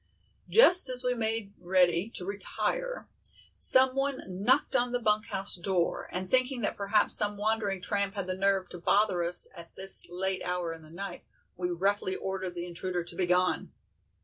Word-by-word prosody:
Just 360 Hz, -, +7 dB
as 250 Hz, 0 st, 0 dB
we 250 Hz, 0 st, 0 dB
made 220 Hz, -3 st, -3 dB
ready 180 Hz, +1 st, +1 dB
to 180 Hz, -, -5 dB
retire -, -, -3 dB, 0.5 s
someone 265 Hz, +1 st, +3 dB
knocked 200 Hz, +9 st, 0 dB
on 245 Hz, 0 st, 0 dB
the 245 Hz, -, 0 dB
bunk 215 Hz, -1 st, +1 dB
house 195 Hz, -1 st, -2 dB
door, 175 Hz, -1 st, -2 dB
and 185 Hz, +1 st, -3 dB
thinking 255 Hz, +2 st, +1 dB
that 205 Hz, -, -1 dB
perhaps 205 Hz, +1 st, +1 dB
some 205 Hz, -1 st, +2 dB
wandering 205 Hz, -3 st, -2 dB
tramp 200 Hz, -1 st, -2 dB
had 200 Hz, -2 st, -3 dB
the 185 Hz, -, -2 dB
nerve 195 Hz, 0 st, 0 dB
to 175 Hz, -, -10 dB
bother 195 Hz, 0 st, +1 dB
us 170 Hz, +1 st, +8 dB
at 170 Hz, -1 st, -12 dB
this 190 Hz, -2 st, -1 dB
late 190 Hz, +2 st, -3 dB
hour 180 Hz, -2 st, -3 dB
in 165 Hz, -, -12 dB
the 155 Hz, -, -15 dB
night, 195 Hz, +5 st, -8 dB, 0.3 s
we 180 Hz, 0 st, -4 dB
roughly 190 Hz, +2 st, -1 dB
ordered 190 Hz, -2 st, -5 dB
the 175 Hz, 0 st, -5 dB
intruder 175 Hz, 0 st, -5 dB
to 170 Hz, -, -7 dB
be 180 Hz, 0 st, -2 dB
gone. 180 Hz, +1 st, 0 dB
195 Hz, 175 wpm, -28 LUFS, 180-220 Hz, 0.5 s, us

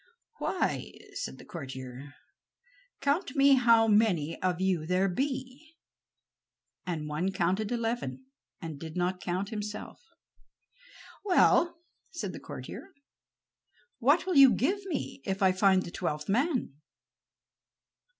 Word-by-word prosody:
"Why," -, -, -1 dB, 0.2 s
said -, -, -5 dB
the -, -, -13 dB
courtier, 130 Hz, -2 st, -8 dB, 0.9 s
"count 285 Hz, +1 st, 0 dB
me 275 Hz, 0 st, +6 dB
how 230 Hz, -3 st, +5 dB
many 205 Hz, -8 st, +2 dB
of 180 Hz, -1 st, 0 dB
you 185 Hz, -4 st, 0 dB
there 185 Hz, +2 st, +2 dB
be," 265 Hz, -, -4 dB, 1.1 s
and 160 Hz, -4 st, -3 dB
one 155 Hz, +6 st, -1 dB
counted 190 Hz, +4 st, 0 dB
eleven 225 Hz, -, -2 dB, 0.3 s
and 160 Hz, -4 st, -7 dB
did 160 Hz, +2 st, -7 dB
not 180 Hz, +1 st, -1 dB
count 185 Hz, +2 st, -2 dB
himself. 210 Hz, -1 st, -6 dB, 1.2 s
"Well," 350 Hz, -3 st, +4 dB, 0.3 s
said -, -, -5 dB
the -, -, -7 dB
courtier, -, -, -9 dB, 1.0 s
"what 285 Hz, +9 st, +3 dB
will 370 Hz, -5 st, +1 dB
you 270 Hz, -2 st, +9 dB
give 385 Hz, -, 0 dB
me 290 Hz, -4 st, -4 dB
if 195 Hz, 0 st, -2 dB
I 190 Hz, -, +6 dB
find 185 Hz, 0 st, +3 dB
the 170 Hz, -, -8 dB
twelfth 150 Hz, -4 st, -3 dB
man?" 250 Hz, -, 0 dB
195 Hz, 120 wpm, -29 LUFS, 170-260 Hz, 1.2 s, you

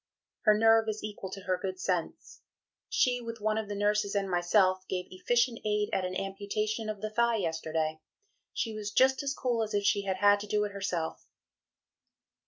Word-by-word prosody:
Her 215 Hz, -1 st, +6 dB
nerve 225 Hz, 0 st, +5 dB
is 215 Hz, 0 st, -4 dB
equal 205 Hz, -2 st, -6 dB
to 195 Hz, +1 st, -7 dB
her 185 Hz, -2 st, 0 dB
good 190 Hz, -2 st, -4 dB
sense; 180 Hz, -3 st, -3 dB, 0.5 s
she, 245 Hz, -1 st, +2 dB
with 230 Hz, -1 st, -6 dB
one 215 Hz, +1 st, 0 dB
of 215 Hz, -2 st, -5 dB
the 205 Hz, -, -3 dB
nurses 205 Hz, 0 st, +1 dB
and 200 Hz, -1 st, +1 dB
myself, 185 Hz, +1 st, +2 dB
gave 180 Hz, -1 st, -2 dB
efficient 235 Hz, +5 st, +1 dB
aid 210 Hz, 0 st, 0 dB
at 190 Hz, -, +1 dB
an 185 Hz, 0 st, -4 dB
amputation 205 Hz, +3 st, -2 dB
of 210 Hz, -2 st, -5 dB
the 215 Hz, 0 st, -3 dB
thigh 235 Hz, +1 st, +2 dB
yesterday. 160 Hz, -3 st, -2 dB, 0.5 s
She 225 Hz, -, -2 dB
was 210 Hz, -1 st, -4 dB
just 260 Hz, +5 st, +3 dB
as 280 Hz, 0 st, -2 dB
cool 240 Hz, -3 st, 0 dB
as 215 Hz, -1 st, -2 dB
if 205 Hz, -, +1 dB
she 200 Hz, 0 st, +2 dB
had 190 Hz, -1 st, -1 dB
had 205 Hz, +1 st, +5 dB
to 210 Hz, -, -7 dB
do 210 Hz, 0 st, +1 dB
it 205 Hz, -, -3 dB
herself." 185 Hz, -5 st, -3 dB
205 Hz, 190 wpm, -30 LUFS, 190-220 Hz, 0.5 s, Her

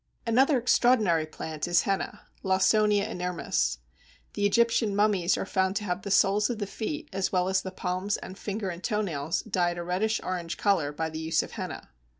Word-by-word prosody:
Another 265 Hz, +5 st, +4 dB
extraordinary 225 Hz, -9 st, +3 dB
plant 155 Hz, 0 st, -5 dB
is 175 Hz, 0 st, +3 dB
Henna 195 Hz, -1 st, -2 dB, 0.2 s
(Lawsonia 200 Hz, +2 st, +3 dB
inermis). 180 Hz, -, -1 dB, 0.6 s
The 205 Hz, 0 st, +2 dB
Egyptian 230 Hz, -1 st, +2 dB
mummies 200 Hz, -4 st, +2 dB
are -, -, -2 dB
found 190 Hz, 0 st, 0 dB
to 210 Hz, -, -1 dB
have 180 Hz, -2 st, -2 dB
the 200 Hz, -, -6 dB
soles 200 Hz, +2 st, +3 dB
of 240 Hz, -, -2 dB
the 205 Hz, -, -2 dB
feet, 295 Hz, +10 st, -5 dB
as 195 Hz, 0 st, -1 dB
well 180 Hz, -1 st, +1 dB
as 190 Hz, 0 st, +1 dB
the 190 Hz, -, -5 dB
palms 185 Hz, +2 st, -2 dB
and 185 Hz, -, -9 dB
finger 200 Hz, 0 st, -4 dB
and 175 Hz, +1 st, -9 dB
toe 210 Hz, -2 st, 0 dB
nails, 160 Hz, -5 st, -2 dB
dyed 175 Hz, -4 st, 0 dB
a 175 Hz, -, -3 dB
reddish 195 Hz, +6 st, 0 dB
orange 175 Hz, -2 st, -3 dB
colour 190 Hz, -8 st, +1 dB
by 160 Hz, +2 st, -3 dB
the 155 Hz, -, -5 dB
use 160 Hz, 0 st, +1 dB
of -, -, -9 dB
henna. -, -, -6 dB
190 Hz, 190 wpm, -27 LUFS, 175-210 Hz, 0.6 s, Another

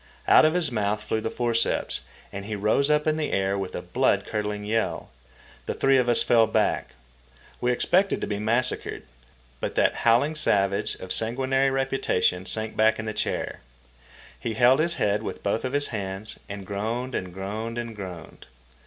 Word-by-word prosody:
Out -, -, +7 dB
of 155 Hz, +2 st, +2 dB
his 165 Hz, -6 st, +1 dB
month 105 Hz, -1 st, -1 dB
flew 110 Hz, +1 st, -1 dB
the 110 Hz, -, -2 dB
forceps, 115 Hz, -, 0 dB, 0.3 s
and 100 Hz, 0 st, -6 dB
he 110 Hz, 0 st, -4 dB
rose 110 Hz, +8 st, +2 dB
up 150 Hz, 0 st, +2 dB
in 155 Hz, 0 st, +1 dB
the 155 Hz, -, -2 dB
air 95 Hz, 0 st, +1 dB
with 95 Hz, -2 st, -4 dB
a -, -, -4 dB
blood -, -, +1 dB
curdling 105 Hz, -1 st, -3 dB
yell. 110 Hz, +1 st, -1 dB, 0.6 s
The -, -, -2 dB
three 135 Hz, 0 st, +3 dB
of 125 Hz, -1 st, +1 dB
us 120 Hz, -, +4 dB
fell 115 Hz, -2 st, +4 dB
back. 110 Hz, -1 st, 0 dB, 0.6 s
We 125 Hz, -, +1 dB
expected 185 Hz, +10 st, +2 dB
to -, -, -2 dB
be 100 Hz, -1 st, -3 dB
massacred. 120 Hz, +4 st, 0 dB, 0.6 s
But -, -, -4 dB
that -, -, +2 dB
howling 120 Hz, +7 st, +3 dB
savage 100 Hz, -10 st, +1 dB
of 95 Hz, -, -5 dB
sanguinary 130 Hz, +4 st, +1 dB
reputation 135 Hz, -9 st, 0 dB
sank 110 Hz, 0 st, 0 dB
back 110 Hz, +1 st, +3 dB
in 110 Hz, -, -5 dB
the 110 Hz, -, -3 dB
chair. -, -, -3 dB, 0.8 s
He 115 Hz, -2 st, -3 dB
held 125 Hz, +4 st, +5 dB
his 170 Hz, +2 st, +1 dB
head 105 Hz, +1 st, +1 dB
in -, -, -3 dB
both 100 Hz, +3 st, 0 dB
his 140 Hz, +2 st, -2 dB
hands, 100 Hz, -1 st, -5 dB
and 100 Hz, -1 st, -6 dB
groaned 115 Hz, +6 st, -3 dB
and 90 Hz, -5 st, -3 dB
groaned 105 Hz, +5 st, -5 dB
and 120 Hz, -1 st, -5 dB
groaned. 90 Hz, -5 st, -9 dB
110 Hz, 180 wpm, -25 LUFS, 100-130 Hz, 0.8 s, Out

